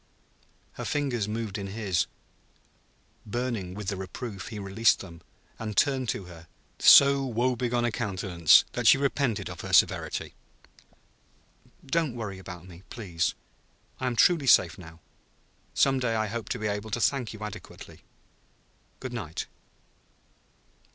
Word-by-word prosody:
Her - - -7
fingers 130 -8 -1
moved 110 -2 -4
in 100 - -5
his; 95 -3 -1 1.2
burning 110 -5 -3
with 105 -2 -4
the 100 - -2
reproof, 95 +1 -7
he 110 - -7
released 100 +3 +2
them, 85 -3 -11 0.4
and 110 -3 -5
turned 130 -4 +2
to - - -2
her 85 -2 -13 0.3
so 140 0 +8
woebegone 120 -1 0
a 120 - 0
countenance 95 -7 +3
that - - -1
she - - +8
repented 135 -7 0
of - - -8
her - - -6
severity. - - +2 1.5
"Don't 150 -2 0
worry 105 -5 -5
about 90 -2 -10
me, 90 -1 -13
please. 90 -8 -2 0.6
I 130 - -2
am 125 - -1
truly 150 +3 +4
safe 90 -8 +5
now. 80 -3 -13 0.7
Some 135 -1 +3
day 120 -3 0
I 110 0 +1
hope 110 +1 -5
to - - -2
be 110 - -5
able 105 +1 -2
to 110 - -2
thank 125 -1 +1
you 110 - -10
adequately. 105 -2 -9 1.0
Good 130 -2 -6
night!" 90 -9 -5
110 Hz, 140 wpm, -27 LUFS, 95-125 Hz, 1.5 s, so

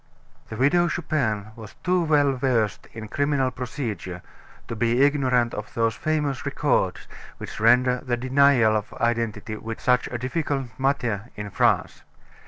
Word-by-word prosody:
The 110 - -6
Widow 175 +7 +3
Chupin 120 -12 -2
was 110 -3 -11
too 180 -1 +2
well 145 -3 +3
versed 125 -5 0
in 110 -1 -8
criminal 140 +1 0
procedure 115 - -5 0.4
to 115 - -5
be 120 +3 +2
ignorant 130 -4 +2
of 105 - -7
those 115 -1 +1
famous 150 +1 -1
records - - 0 0.3
which - - -8
render 125 +3 +4
the 125 -3 -2
denial 130 -3 +4
of 105 -1 -3
identity 115 -2 -1 0.2
such 125 -4 +1
a 120 - -4
difficult 135 +1 -2
matter 125 -5 -1
in 105 -1 -6
France. - - +1
125 Hz, 140 wpm, -24 LUFS, 110-140 Hz, 0.4 s, render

